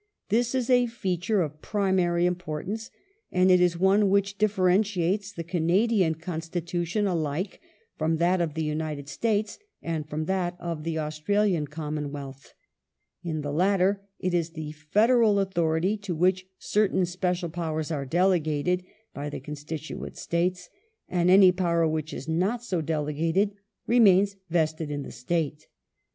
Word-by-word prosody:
This 240 Hz, +4 st, +1 dB
is 250 Hz, -2 st, 0 dB
a 245 Hz, -1 st, +4 dB
feature 195 Hz, -3 st, 0 dB
of 155 Hz, 0 st, -7 dB
primary 185 Hz, -4 st, +1 dB
importance, 180 Hz, +5 st, -3 dB, 0.4 s
and 185 Hz, 0 st, +4 dB
it 180 Hz, -1 st, +6 dB
is 175 Hz, -1 st, +3 dB
one 195 Hz, +3 st, +4 dB
which 200 Hz, 0 st, +1 dB
differentiates 195 Hz, -1 st, +1 dB
the 170 Hz, -4 st, -6 dB
Canadian 175 Hz, +2 st, +2 dB
Constitution 170 Hz, +3 st, -3 dB
alike 170 Hz, 0 st, -2 dB, 0.4 s
from 160 Hz, +1 st, +1 dB
that 175 Hz, +2 st, +2 dB
of 160 Hz, -3 st, -2 dB
the 160 Hz, -, -1 dB
United 150 Hz, -2 st, -3 dB
States, 215 Hz, +4 st, -1 dB, 0.2 s
and 155 Hz, -2 st, -4 dB
from 155 Hz, +1 st, -3 dB
that 180 Hz, -1 st, -1 dB
of 165 Hz, -3 st, -4 dB
the 165 Hz, -1 st, -2 dB
Australian 160 Hz, +2 st, 0 dB
Commonwealth. 145 Hz, -3 st, -6 dB, 0.7 s
In 160 Hz, -3 st, -3 dB
the 145 Hz, 0 st, -4 dB
latter 195 Hz, +3 st, +2 dB, 0.2 s
it 185 Hz, -1 st, -2 dB
is 165 Hz, -1 st, 0 dB
the 155 Hz, -2 st, -5 dB
federal 210 Hz, +8 st, +3 dB
authority 180 Hz, 0 st, +1 dB
to 200 Hz, -4 st, -4 dB
which 185 Hz, +3 st, +1 dB
certain 200 Hz, -3 st, +1 dB
special 180 Hz, -1 st, -2 dB
powei's 160 Hz, -2 st, -3 dB
are 145 Hz, -3 st, -2 dB
delegated 175 Hz, +1 st, +1 dB, 0.3 s
by 145 Hz, +1 st, -4 dB
the 145 Hz, -, -6 dB
constituent 150 Hz, +2 st, -7 dB
states, 180 Hz, +1 st, -1 dB, 0.4 s
and 175 Hz, -1 st, +2 dB
any 190 Hz, 0 st, +8 dB
power 170 Hz, -2 st, +1 dB
which 155 Hz, -1 st, -2 dB
is 135 Hz, -, -7 dB
not 190 Hz, +9 st, 0 dB
so 185 Hz, -8 st, -1 dB
delegated 160 Hz, +5 st, 0 dB, 0.3 s
remains 200 Hz, -4 st, +5 dB
vested 160 Hz, -2 st, 0 dB
in 145 Hz, -1 st, -3 dB
the -, -, -8 dB
State. 150 Hz, +4 st, -2 dB
175 Hz, 140 wpm, -26 LUFS, 155-195 Hz, 0.7 s, any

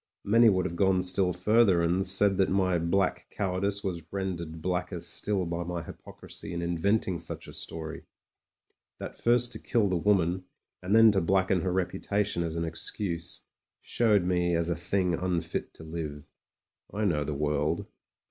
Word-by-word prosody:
Many 115 Hz, +3 st, +5 dB
would 95 Hz, -2 st, +1 dB
have 85 Hz, -, -3 dB
gone 95 Hz, 0 st, +2 dB
still 90 Hz, 0 st, +2 dB
further, 95 Hz, -1 st, +3 dB
and 90 Hz, +3 st, +1 dB
said 95 Hz, +1 st, +3 dB
that 95 Hz, -, +2 dB
my 95 Hz, -2 st, +2 dB
black 90 Hz, +3 st, 0 dB
cow 95 Hz, -3 st, -2 dB
ardice 100 Hz, +1 st, 0 dB
was 90 Hz, -4 st, -3 dB
rendered 85 Hz, -5 st, -4 dB
blacker 90 Hz, +1 st, -2 dB
still 90 Hz, +3 st, -1 dB
by 85 Hz, +1 st, -3 dB
my 85 Hz, -1 st, -4 dB
hypocrisy 85 Hz, -, -8 dB
in 85 Hz, -, -3 dB
inventing 90 Hz, +2 st, 0 dB
such -, -, -6 dB
a -, -, -10 dB
story; 80 Hz, 0 st, -6 dB, 0.9 s
that -, -, -7 dB
first 120 Hz, 0 st, +2 dB
to -, -, -2 dB
kill 110 Hz, -4 st, +1 dB
the 95 Hz, -, 0 dB
woman, 90 Hz, -1 st, +1 dB, 0.4 s
and 95 Hz, +4 st, +1 dB
then 115 Hz, -1 st, +8 dB
to 100 Hz, -, +1 dB
blacken 95 Hz, +1 st, +2 dB
her 95 Hz, -, -1 dB
reputation 95 Hz, +1 st, -1 dB
as 85 Hz, -1 st, -3 dB
an 85 Hz, 0 st, -1 dB
excuse, 85 Hz, +1 st, -3 dB, 0.4 s
showed 105 Hz, -5 st, +2 dB
me 90 Hz, -1 st, +1 dB
as 85 Hz, 0 st, 0 dB
a 85 Hz, -, 0 dB
thing 90 Hz, +1 st, +2 dB
unfit 90 Hz, 0 st, -2 dB
to -, -, -12 dB
live. 80 Hz, -3 st, -6 dB, 0.7 s
I 105 Hz, +1 st, -1 dB
know 75 Hz, -7 st, +1 dB
the 75 Hz, 0 st, -4 dB
world. 75 Hz, +2 st, -1 dB
90 Hz, 170 wpm, -28 LUFS, 85-100 Hz, 0.9 s, then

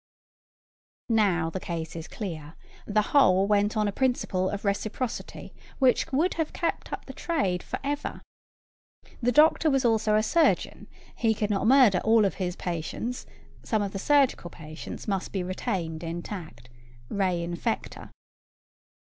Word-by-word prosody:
Now, 190 Hz, -8 st, +2 dB
the 190 Hz, -, -3 dB
case 165 Hz, -2 st, -5 dB
is 165 Hz, 0 st, -6 dB
clear: 165 Hz, -7 st, -6 dB, 0.3 s
the 210 Hz, 0 st, +2 dB
whole 195 Hz, -9 st, +5 dB
went 205 Hz, +1 st, +2 dB
on 210 Hz, -1 st, +2 dB
a -, -, 0 dB
principle 200 Hz, -6 st, 0 dB
of 205 Hz, 0 st, -5 dB
reciprocity 215 Hz, +4 st, -3 dB, 0.2 s
which 260 Hz, -2 st, +2 dB
would 315 Hz, +7 st, +2 dB
have 310 Hz, -, -3 dB
kept 335 Hz, -, -2 dB
up -, -, -5 dB
the -, -, -9 dB
trade 195 Hz, -, -1 dB
for -, -, -5 dB
ever. 285 Hz, +1 st, -3 dB, 1.0 s
The 245 Hz, +1 st, +2 dB
doctor 310 Hz, +4 st, +5 dB
was 270 Hz, -2 st, +2 dB
also 220 Hz, -2 st, +3 dB
a 215 Hz, -, +3 dB
surgeon: 330 Hz, +9 st, +1 dB, 0.3 s
he 225 Hz, -2 st, +1 dB
could 210 Hz, 0 st, -1 dB
not 200 Hz, +1 st, +1 dB
murder 250 Hz, -8 st, +6 dB
all 220 Hz, 0 st, +5 dB
his 180 Hz, -2 st, -3 dB
patients: 180 Hz, +9 st, -4 dB, 0.3 s
some 215 Hz, -2 st, 0 dB
of 200 Hz, -, -3 dB
the 195 Hz, -, -5 dB
surgical 275 Hz, -7 st, +2 dB
patients 155 Hz, +5 st, -9 dB
must 195 Hz, -2 st, -2 dB
be 190 Hz, -3 st, -2 dB
retained 180 Hz, -4 st, -3 dB
intact; 165 Hz, -, -7 dB, 0.4 s
re 185 Hz, -2 st, 0 dB
infectâ. 175 Hz, +7 st, -4 dB
205 Hz, 145 wpm, -27 LUFS, 180-240 Hz, 1.0 s, murder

